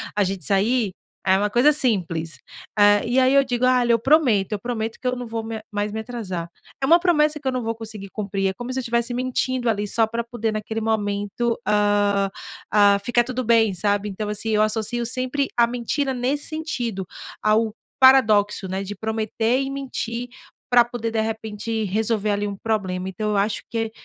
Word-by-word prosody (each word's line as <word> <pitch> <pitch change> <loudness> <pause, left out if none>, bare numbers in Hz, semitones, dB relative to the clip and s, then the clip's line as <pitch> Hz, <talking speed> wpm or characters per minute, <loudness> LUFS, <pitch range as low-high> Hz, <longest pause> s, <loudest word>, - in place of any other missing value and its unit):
a 205 - +3
gente 190 -4 -3
sair?" 210 +1 +1 0.3
É 190 0 +4
uma 205 +1 0
coisa 245 +7 +5
simples. 180 - 0 0.4
Eh, 205 +1 +5
e 245 +2 0
aí 260 +1 +4
eu 275 0 +6
digo: 245 -1 0
"Ah, 255 -1 +4
lhe 240 -1 +3
eu 230 - +3
prometo, 245 - +3
eu 205 - -2
prometo 225 -1 -4
que 255 - -2
eu 250 - +1
não 245 0 -6
vou 225 0 -3
me 225 0 -5
mais 205 0 -1
me 220 - -3
atrasar." 195 -8 -5 0.3
É - - +2
uma 335 +4 +6
promessa 305 -4 +2
que 280 - -6
eu - - +2
não 255 -2 -2
vou 225 - -1
conseguir 215 -3 -8
cumprir, 195 -2 -2
é - - -3
como 245 +4 -6
se 260 - -1
eu - - -1
estivesse 235 0 0
mentindo 255 0 -1
ali 210 -2 -1
só 225 +2 +2
pra 230 +1 -2
poder, 230 -1 -3
naquele 220 +1 -3
momento, 215 +1 -1
ah 205 -1 +2 0.4
ah, 205 -1 +5
ficar 240 +1 +3
tudo 255 0 -3
bem, 225 -3 +3
sabe? 205 +2 0
Então, 205 +2 -4
assim, 210 +2 -3
eu 215 -1 +3
associo 220 +2 -1
sempre 255 +3 -1
a 235 - +6
mentira 245 +3 -2
nesse 260 +4 -2
sentido, 245 - -3 0.4
ao 215 +1 +2 0.3
paradoxo, 215 -7 +5
né, 190 +1 -3
de 200 +1 -5
prometer 220 +3 -1
e 270 - -3
mentir 245 -3 -4 0.4
pra 245 -1 +6
poder, 235 -1 -4
de 225 -1 0
repente, 220 0 -3
resolver 215 +1 0
ali 205 0 -1
um 200 -1 -5
problema. 190 -4 -2
Então, 210 +3 -3
eu 205 - +1
acho 205 +2 0
que, 225 -1 -2
225 Hz, 200 wpm, -23 LUFS, 205-245 Hz, 0.4 s, eu